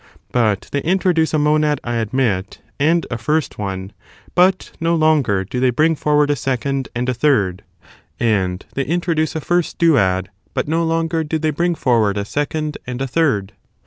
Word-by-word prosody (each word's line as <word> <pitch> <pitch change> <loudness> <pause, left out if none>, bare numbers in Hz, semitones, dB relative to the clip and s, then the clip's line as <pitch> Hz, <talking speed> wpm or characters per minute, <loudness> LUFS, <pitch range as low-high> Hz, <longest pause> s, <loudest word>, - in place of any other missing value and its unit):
But 110 -4 +1
they 140 - -1
introduce 175 -1 +1
a 155 - +1
monad, 150 -1 +2
I 120 -1 -2
admit, 110 -4 -1 0.2
and 165 +3 +2
a 115 - -3
first 150 +3 -1
one, 95 -1 -4 0.4
but 185 +1 +3
no 165 +1 +1
longer 150 -12 +2
do 115 +6 -4
they 130 0 +3
bring 155 +7 +2
forward 150 -1 +2
a - - +2
second 135 +1 -2
and 125 +1 -1
a 130 - +1
third; 105 -9 +1 0.6
and 95 -5 0
^they 135 -1 -1
introduce 165 -1 0
a 160 - -2
first 175 +2 0
duad, 95 - +3 0.3
but - - -1
no 165 +2 +1
longer 165 0 0
do 160 +1 -2
they 155 0 0
bring 170 +3 0
forward 115 -8 +2
a 100 - -2
second 150 +4 -2
and 125 0 -4
a 135 - -1
third. 130 -9 0
145 Hz, 175 wpm, -19 LUFS, 115-160 Hz, 0.6 s, but